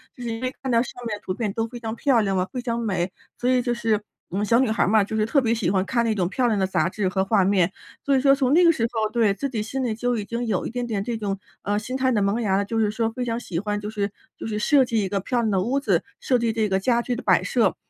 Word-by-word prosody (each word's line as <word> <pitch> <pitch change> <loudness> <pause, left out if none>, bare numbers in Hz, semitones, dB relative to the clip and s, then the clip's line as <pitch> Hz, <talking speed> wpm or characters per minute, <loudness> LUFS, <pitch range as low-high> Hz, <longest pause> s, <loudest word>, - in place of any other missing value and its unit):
就 - - -12
是 235 - -3
因 225 0 -4
为 255 0 -2
看 265 - -2
到 230 - +4
上 - - -8
面 210 -2 -3
的 - - -19
图 185 - -2
片 215 0 -2
都 225 +1 -1
非 240 +1 -9
常 225 -1 -4
漂 255 -3 +3
亮 195 -2 0
嘛， 180 - +1
非 250 - -3
常 235 -1 -2
美。 190 -5 -1 0.3
所 245 - +1
以 255 -1 +3
就 240 0 0
是 225 -3 0 0.3
我 185 - -4
们 205 - 0
小 230 +2 +4
女 260 -3 +2
孩 220 - +2
儿 - - +1
嘛， 215 0 +5
就 215 +2 -4
是 215 - +2
特 280 - +3
别 230 -2 +1
喜 220 -7 0
欢 190 -1 +1
看 235 0 +1
那 225 - +1
种 180 -4 +1
漂 250 +5 +1
亮 220 -3 +1
的 190 - +2
杂 175 -3 +1
志 200 0 -1
和 190 +1 0
画 200 -1 +3
面。 190 -2 +3 0.3
所 280 - +3
以 - - +1
说 275 0 +6
从 270 -1 +1
那 350 +3 +6
个 335 - +7
时 230 -8 0
候 220 -2 0
对， 220 -3 +3
自 280 +8 -3
己 230 -5 -2
心 265 +4 -3
里 235 -3 0
就 245 +1 -1
已 210 - -3
经 235 +3 -3
有 200 -5 0
一 - - -3
点 245 0 -3
点 210 -4 -2
这 235 +2 -3
种， 200 -3 -3 0.2
呃， 205 +1 0
心 235 +4 -5
态 260 -1 +2
的 215 -4 +2
萌 200 +4 +1
芽 195 -4 +1
了， 200 - 0
就 225 +2 -2
是 215 -2 +2
说 225 +1 0
非 250 +2 -4
常 230 -1 -2
喜 175 -8 -4
欢 205 +1 -2
就 210 0 -5
是 205 -2 -2 0.3
就 - - -6
是 215 -1 -2
设 270 +4 +4
计 225 -3 0
一 190 - -2
个 200 0 0
漂 240 +6 -1
亮 220 -2 0
的 190 -2 +2
屋 255 +8 0
子， 280 - +1 0.2
设 250 -2 +1
计 230 -1 +1
这 220 -1 +1
个 190 0 +2
家 235 +4 +2
具 245 +1 -2
的 240 - -5
摆 - - +4
设。 - - +2
225 Hz, 355 characters per minute, -24 LUFS, 205-245 Hz, 0.3 s, 个